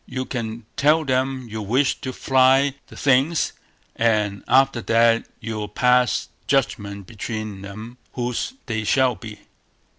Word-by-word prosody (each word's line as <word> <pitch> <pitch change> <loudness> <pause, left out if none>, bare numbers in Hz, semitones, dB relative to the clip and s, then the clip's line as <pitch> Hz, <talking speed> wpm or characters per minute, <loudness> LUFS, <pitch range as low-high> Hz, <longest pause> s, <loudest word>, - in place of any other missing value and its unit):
You 130 0 -4
can 115 -3 -5
tell 155 +2 +3
them 130 -1 -1
you 110 0 -5
wish 125 +7 +1
to 130 - -4
try 130 +2 +3
the - - -13
things, 140 +4 +2 0.4
and 105 -3 +1
after 130 -1 +3
that, 115 0 +3
you'll 110 -2 -4
pass 125 +3 +2 0.2
judgment 100 -7 -1
between 110 -1 -6
them, 110 +5 -9
whose 125 - -2
they 110 -3 -2
shall 130 +3 +3
be". 105 -2 -10
120 Hz, 130 wpm, -22 LUFS, 110-130 Hz, 0.4 s, tell